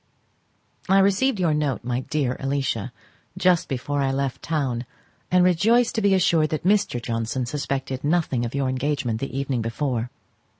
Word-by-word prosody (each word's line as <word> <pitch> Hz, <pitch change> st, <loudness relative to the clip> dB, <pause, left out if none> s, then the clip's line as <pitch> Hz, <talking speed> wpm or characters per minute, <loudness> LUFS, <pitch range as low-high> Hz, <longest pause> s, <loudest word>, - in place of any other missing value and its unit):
I 195 Hz, -, +5 dB
received 200 Hz, +5 st, +3 dB
your 170 Hz, -4 st, +2 dB
note, 150 Hz, -4 st, -1 dB
my 125 Hz, +1 st, -1 dB
dear 130 Hz, -2 st, -1 dB
Alicia, 135 Hz, -4 st, -2 dB, 0.5 s
just 180 Hz, -2 st, +3 dB
before 140 Hz, +2 st, -2 dB
I 135 Hz, -1 st, +1 dB
left 135 Hz, -1 st, -2 dB
town, 130 Hz, -6 st, -2 dB, 0.4 s
and 180 Hz, 0 st, +4 dB
rejoice 225 Hz, +7 st, +3 dB
to 225 Hz, -, -1 dB
be 200 Hz, -2 st, +4 dB
assured 165 Hz, -4 st, +3 dB
that 155 Hz, -, -3 dB
Mr. 200 Hz, -10 st, +2 dB
Johnson 115 Hz, +2 st, -2 dB
suspected 135 Hz, 0 st, -3 dB
nothing 150 Hz, -6 st, +1 dB
of 120 Hz, +3 st, -4 dB
your 140 Hz, -1 st, 0 dB
engagement 130 Hz, -3 st, -1 dB
the 135 Hz, -1 st, -4 dB
evening 135 Hz, -3 st, -1 dB
before. 120 Hz, +1 st, -2 dB
140 Hz, 160 wpm, -24 LUFS, 125-175 Hz, 0.5 s, I